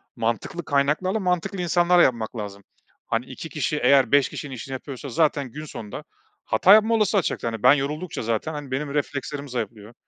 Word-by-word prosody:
mantıklı 120 +9 -2
kaynaklarla, 150 +9 +1
mantıklı 180 0 -1
insanlarla 175 +1 +4
yapmak 115 -2 0
lazım. 100 -1 -6 0.4
Hani, - - -1
2 - - -8
kişi - - -2
eğer 135 -4 +5
5 140 -1 +4
kişinin 140 -4 -7
işini 130 +3 -7
yapıyorsa 135 +1 -7
zaten 145 -2 +1
gün 155 +5 -7
sonunda 105 -8 -8 0.4
hata 195 - +5
yapma 220 +2 +5
olasılığı 210 -2 +3
artacaktır. 155 - -2
Hani, 115 -2 -7
ben - - +8
yoruldukça 150 +5 -3
zaten, 115 +8 -2
hani, 145 -3 -7
benim 140 +2 -2
reflekslerim 145 0 -3
zayıflıyor. 115 -2 -5
140 Hz, 175 wpm, -24 LUFS, 120-175 Hz, 0.4 s, ben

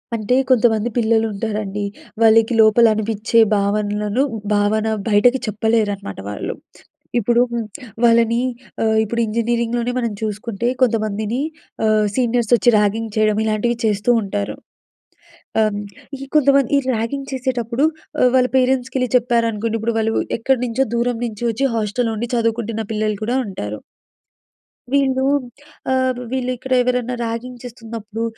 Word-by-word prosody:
అంటే 225 +2 0
కొంతమంది 230 -2 +3
పిల్లలుంటారండి. 215 -2 0 0.4
వాళ్ళకి 225 +1 +5
లోపలనిపిచ్చే 220 0 +3 0.2
భావనలను, 210 +3 0 0.3
భావన 210 +2 +1 0.2
బయటకి 245 +5 +4
చెప్పలేరనమాట 215 - -1
వాళ్ళు. 105 - -4 0.6
ఇప్పుడు 235 +2 +2 0.6
వాళ్ళని 230 0 +4 0.4
ఆహ్, 220 0 +2
ఇప్పుడు 235 +2 -2
ఇంజనీరింగ్‌లోనే 235 +2 -1
మనం 235 -2 -1
చూసుకుంటే 215 +1 -3
కొంతమందిని 220 0 0 0.4
ఆహ్, 215 -1 +3
సీనియర్సొచ్చి 240 -1 +2
ర్యాగింగ్ 210 +1 0
చేయడం, 215 -1 +2
ఇలాంటివి 220 +2 0
చేస్తూ 210 +1 0
ఉంటారు. 200 0 -3 1.0
అహ్, 215 -1 +4
హ్మ్. 205 0 -4 0.4
ఈ - - -5
కొంతమంది 275 -3 +4
ఈ - - +4 0.2
ర్యాగింగ్ 270 +5 -3
చేసేటప్పుడు 255 0 -1 0.4
అహ్, 250 - +6
వాళ్ళ 255 -1 +4
పేరెంట్స్‌కెళ్ళి 255 0 +1
చెప్పారనుకోండి. 230 -2 0
ఇప్పుడు 230 0 -1
వాళ్ళు 225 0 0 0.3
ఎక్కడి 265 +2 +1
నుంచో 250 +3 0
దూరం 240 0 0
నుంచి 220 +1 -6
వచ్చి 245 +5 -1
హాస్టల్‌లో 225 +2 -1
ఉండి 235 +2 -3
చదువుకుంటున్న 230 -1 -1
పిల్లలు 215 -1 -1
కూడా 245 +4 0
ఉంటారు. 105 - -5 1.1
వీళ్ళూ 265 -1 +2 0.7
ఆహ్, 260 -1 +1
వీళ్ళిక్కడ 255 0 -3
ఎవరన్నా 250 0 -1
ర్యాగింగ్ 235 +2 -5
చేస్తున్నప్పుడు, 225 -2 -7
230 Hz, 115 wpm, -19 LUFS, 215-245 Hz, 1.1 s, అహ్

